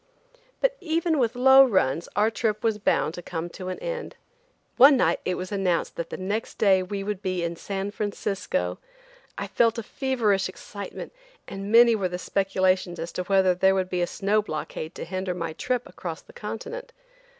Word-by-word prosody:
But -, -, +2 dB
even 325 Hz, -2 st, 0 dB
with 240 Hz, -1 st, +1 dB
low 265 Hz, +2 st, +8 dB
runs 170 Hz, -, +1 dB
our 210 Hz, +3 st, +3 dB
trip 215 Hz, -2 st, -1 dB
was 220 Hz, -2 st, +1 dB
bound 160 Hz, -5 st, +1 dB
to 175 Hz, -, -7 dB
come 170 Hz, 0 st, -5 dB
to 185 Hz, +1 st, -8 dB
an 185 Hz, -, -3 dB
end. -, -, -5 dB, 0.6 s
One 275 Hz, +2 st, +8 dB
night -, -, +2 dB
it 185 Hz, -, 0 dB
was 185 Hz, +2 st, -6 dB
announced 190 Hz, -4 st, 0 dB
that 170 Hz, -1 st, -4 dB
the -, -, -5 dB
next 205 Hz, +5 st, -3 dB
day 195 Hz, -3 st, +4 dB
we 195 Hz, +2 st, -4 dB
would 205 Hz, -1 st, -3 dB
be 185 Hz, -3 st, -2 dB
in 170 Hz, 0 st, -2 dB
San 195 Hz, +3 st, -4 dB
Francisco. 195 Hz, -, -2 dB, 0.6 s
I -, -, -3 dB
felt 230 Hz, 0 st, +2 dB
a 230 Hz, -, -3 dB
feverish 215 Hz, -8 st, 0 dB
excitement, 200 Hz, -, -8 dB, 0.3 s
and 195 Hz, +1 st, -6 dB
many 235 Hz, +1 st, +7 dB
were 195 Hz, -4 st, 0 dB
the 180 Hz, -, -4 dB
speculations 185 Hz, -2 st, 0 dB
as 165 Hz, +1 st, -5 dB
to 180 Hz, -, -3 dB
whether 190 Hz, -1 st, +4 dB
there 190 Hz, +2 st, +3 dB
would 185 Hz, -1 st, -1 dB
be 180 Hz, -1 st, 0 dB
a 175 Hz, -, +1 dB
snow 205 Hz, +4 st, +1 dB
blockade 155 Hz, -2 st, -5 dB
to -, -, -6 dB
hinder 185 Hz, +1 st, -3 dB
my 165 Hz, -2 st, -4 dB
trip 250 Hz, +7 st, -2 dB
across 165 Hz, -3 st, -7 dB
the -, -, -17 dB
Continent. 460 Hz, -, -7 dB
195 Hz, 190 wpm, -25 LUFS, 180-225 Hz, 0.6 s, low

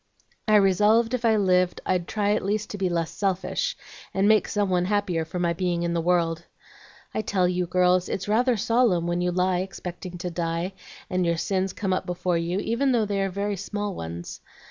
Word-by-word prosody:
I 215 Hz, -, +5 dB
resolved 210 Hz, +4 st, +4 dB
if 245 Hz, -1 st, -1 dB
I 225 Hz, -1 st, +4 dB
lived 185 Hz, -3 st, +2 dB
I'd 180 Hz, -2 st, 0 dB
try 205 Hz, -1 st, 0 dB
at 215 Hz, -, -1 dB
least 210 Hz, +2 st, -1 dB
to 205 Hz, -, -5 dB
be 190 Hz, -1 st, +1 dB
less 165 Hz, -2 st, -1 dB
selfish, 190 Hz, -2 st, -1 dB, 0.4 s
and 195 Hz, +1 st, +3 dB
make 215 Hz, 0 st, +4 dB
some 205 Hz, -1 st, 0 dB
one 180 Hz, -1 st, +2 dB
happier 185 Hz, -5 st, 0 dB
for 160 Hz, -, -6 dB
my 170 Hz, -1 st, +1 dB
being 175 Hz, -1 st, -1 dB
in 170 Hz, 0 st, -1 dB
the 170 Hz, -, 0 dB
world. 170 Hz, -1 st, +1 dB, 0.7 s
I -, -, 0 dB
tell 190 Hz, -4 st, +1 dB
you, 180 Hz, 0 st, -1 dB
girls, 180 Hz, 0 st, +2 dB
it's 190 Hz, -, -3 dB
rather 240 Hz, +3 st, +2 dB
solemn 225 Hz, -6 st, +2 dB
when 175 Hz, +1 st, -1 dB
you 180 Hz, 0 st, +1 dB
lie 180 Hz, 0 st, +1 dB
expecting 180 Hz, -1 st, -6 dB
to 180 Hz, 0 st, -4 dB
die, 170 Hz, +2 st, -2 dB, 0.3 s
and 185 Hz, 0 st, 0 dB
your 170 Hz, -1 st, +1 dB
sins 190 Hz, +2 st, -1 dB
come 195 Hz, -1 st, -2 dB
up 185 Hz, -, -2 dB
before 180 Hz, -1 st, 0 dB
you, 170 Hz, +2 st, -2 dB
even 255 Hz, +5 st, +1 dB
though 225 Hz, -3 st, +2 dB
they 200 Hz, -1 st, -1 dB
are 195 Hz, -, 0 dB
very 200 Hz, +2 st, -2 dB
small 205 Hz, +1 st, -3 dB
ones. 85 Hz, -, -7 dB
185 Hz, 210 wpm, -25 LUFS, 175-205 Hz, 0.7 s, I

